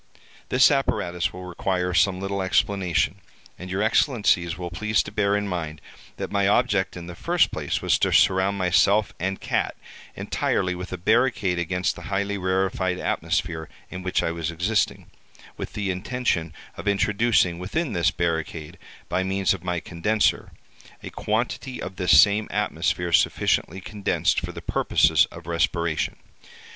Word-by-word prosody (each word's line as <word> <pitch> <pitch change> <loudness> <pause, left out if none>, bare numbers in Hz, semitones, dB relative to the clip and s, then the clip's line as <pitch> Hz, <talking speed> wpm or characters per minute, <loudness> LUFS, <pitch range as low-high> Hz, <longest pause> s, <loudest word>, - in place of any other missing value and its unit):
This - - +5
apparatus 90 -10 0
will 90 0 -9
require 90 0 -2
some 95 +1 +3
little 100 0 -2
explanation, 95 0 +1 0.4
and 90 +1 -8
your 95 +3 -1
Excellencies 105 - +2
will 90 -1 -6
please 110 +4 +1
to - - -9
bear 100 -1 +1
in 105 0 -2
mind 80 -5 -4 0.4
that - - -5
my 100 -1 +2
object, 105 -4 +1
in 85 - -7
the 90 - -8
first - - +1
place, - - -3
was - - +2
to - - +1
surround 95 +1 +3
myself 100 +3 +3
and 95 +2 -2
cat - - -1 0.4
entirely 90 0 -1
with 90 +1 -7
a 95 - -3
barricade 105 -2 +1
against 90 +1 -1
the - - -10
highly 100 +1 -1
rarefied 95 -1 0
atmosphere 80 -3 -2 0.2
in 90 - -6
which 90 0 0
I 85 - 0
was 85 -1 -3
existing, 90 +6 0 0.5
with - - -7
the 100 -2 -2
intention 90 -4 -2 0.3
of - - -7
introducing 100 -3 +2
within 140 - -2
this 85 -2 +2
barricade, 80 -2 -3 0.3
by 95 - 0
means 95 0 +1
of 90 -3 -7
my 90 -1 -1
condenser, 105 +7 0 0.5
a - - -7
quantity 130 - -2
of 95 +1 -7
this 90 -6 +6
same 105 +4 +4
atmosphere 90 -3 -1
sufficiently 95 +2 +2
condensed 100 +2 0
for - - -5
the - - -9
purposes - - +3
of - - -12
respiration. 85 -1 0
95 Hz, 155 wpm, -24 LUFS, 85-100 Hz, 0.5 s, this